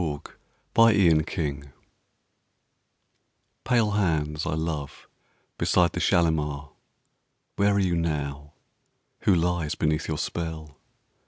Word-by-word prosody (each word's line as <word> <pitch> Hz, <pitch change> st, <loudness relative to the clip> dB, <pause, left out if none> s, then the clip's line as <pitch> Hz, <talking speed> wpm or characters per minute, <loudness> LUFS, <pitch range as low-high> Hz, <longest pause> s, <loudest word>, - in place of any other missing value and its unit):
Kashmiri 100 Hz, -9 st, +5 dB
Song 70 Hz, -4 st, -4 dB, 1.9 s
Pale 115 Hz, -4 st, +2 dB
hands 80 Hz, -6 st, 0 dB
I 80 Hz, -, -1 dB
love 80 Hz, -3 st, -4 dB, 0.5 s
beside 90 Hz, -1 st, +3 dB
the -, -, -4 dB
Shalimar, 75 Hz, -5 st, 0 dB, 0.8 s
Where 100 Hz, 0 st, +2 dB
are -, -, +2 dB
you 90 Hz, -3 st, +1 dB
now? 75 Hz, -3 st, -3 dB, 0.7 s
Who 95 Hz, -, +5 dB
lies 85 Hz, -2 st, 0 dB
beneath 75 Hz, -1 st, 0 dB
your 80 Hz, -, -2 dB
spell? 80 Hz, -2 st, -5 dB
80 Hz, 95 wpm, -26 LUFS, 75-90 Hz, 1.9 s, Kashmiri